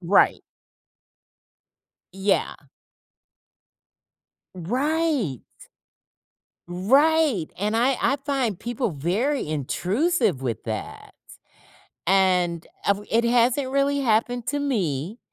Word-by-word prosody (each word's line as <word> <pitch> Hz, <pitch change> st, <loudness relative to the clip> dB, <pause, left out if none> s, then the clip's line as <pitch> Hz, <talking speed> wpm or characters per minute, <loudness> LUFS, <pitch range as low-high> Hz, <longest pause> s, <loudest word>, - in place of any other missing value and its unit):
Right. 185 Hz, +3 st, +3 dB, 1.7 s
Yeah. 195 Hz, +1 st, 0 dB, 2.0 s
Right. 255 Hz, -, -1 dB, 1.3 s
Right, 265 Hz, -, +2 dB
and 210 Hz, +3 st, 0 dB
I 250 Hz, +2 st, +2 dB
I 275 Hz, -, +2 dB
find 260 Hz, -9 st, -1 dB
people 240 Hz, -4 st, -3 dB
very 200 Hz, -, -1 dB
intrusive 180 Hz, -, 0 dB
with 120 Hz, -3 st, -3 dB
that. 110 Hz, -2 st, -6 dB, 0.9 s
And 180 Hz, -3 st, +2 dB, 0.2 s
av 200 Hz, +1 st, +1 dB
it 230 Hz, +1 st, +3 dB
hasn't 245 Hz, +3 st, +2 dB
really 280 Hz, +1 st, +1 dB
happened 240 Hz, 0 st, 0 dB
to 290 Hz, -, -1 dB
me, 200 Hz, -, -2 dB
225 Hz, 80 wpm, -24 LUFS, 180-275 Hz, 2.0 s, Right